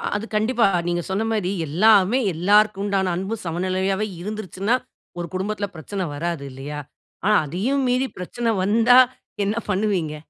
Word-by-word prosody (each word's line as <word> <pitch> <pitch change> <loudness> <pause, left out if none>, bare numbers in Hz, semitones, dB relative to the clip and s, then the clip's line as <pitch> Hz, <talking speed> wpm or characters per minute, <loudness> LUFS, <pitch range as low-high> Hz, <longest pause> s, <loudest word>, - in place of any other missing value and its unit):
அது 205 +2 -2
கண்டிப்பா, 230 +3 +2 0.2
நீங்க 175 0 0
சொன்ன 195 +4 0
மாரி 205 -4 0 0.2
எல்லாமே 205 - +4
எல்லோருக்கும் 200 +4 +3
உண்டான 195 -2 0
அன்பு 195 +5 -3
சமநிலையாகவே 185 +4 -1 0.2
இருந்துருச்சுன்னா, 210 +2 -2 0.4
ஒரு 170 - -3
குடும்பத்துல 205 +2 -2
பிரச்சனை 190 +5 -4
வராது 165 -1 -3
இல்லையா? 140 +3 -6 0.5
ஆனா, 210 +1 +4
அதையும் 225 - -1
மீறி 255 +2 +1
பிரச்சனை 230 +6 -2
வந்தா 230 +5 +5 0.5
என்ன 205 +2 0
பண்ணுவீங்க? 190 -6 0
195 Hz, 135 wpm, -22 LUFS, 180-215 Hz, 0.5 s, வந்தா